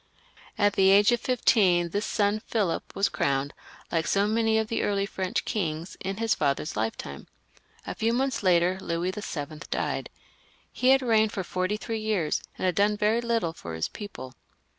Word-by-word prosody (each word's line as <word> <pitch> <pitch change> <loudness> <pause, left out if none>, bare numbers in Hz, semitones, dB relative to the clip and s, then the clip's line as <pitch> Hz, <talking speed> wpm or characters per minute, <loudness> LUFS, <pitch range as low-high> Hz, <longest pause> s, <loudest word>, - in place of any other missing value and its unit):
At 205 -1 +3
the 190 0 +4
age 200 +3 +6
of 240 -1 +1
fifteen 190 -8 +3
this 205 +5 -2
son 205 +1 +1
Philip 200 -7 -1
was 200 - +2
crowned, 140 +1 -1 0.4
like 165 -1 0
so 200 +1 +2
many 220 +1 +2
of 220 -1 0
the 230 - -1
early 200 -1 0
French 190 -2 -3
kings, 165 -4 -3
in 195 +1 -4
his 225 0 +1
father's 140 +1 -1
lifetime. 105 -10 -4 0.6
A - - -4
few 225 +1 0
months 260 +2 0
later 180 0 +3
Louis 170 +1 -1
VII. 155 -7 -6
died. - - -2 0.6
He 255 - -1
had 270 0 +5
reigned 220 -3 +3
for 190 - -2
forty 185 +3 -1
three 225 +1 -4
years, 205 -8 0 0.2
and - - -2
had 180 - +2
done 205 +3 +2
very 215 +3 +2
little 230 -8 0
for 85 - -7
his 80 - -2
people. 200 - -8
200 Hz, 180 wpm, -27 LUFS, 170-220 Hz, 0.6 s, age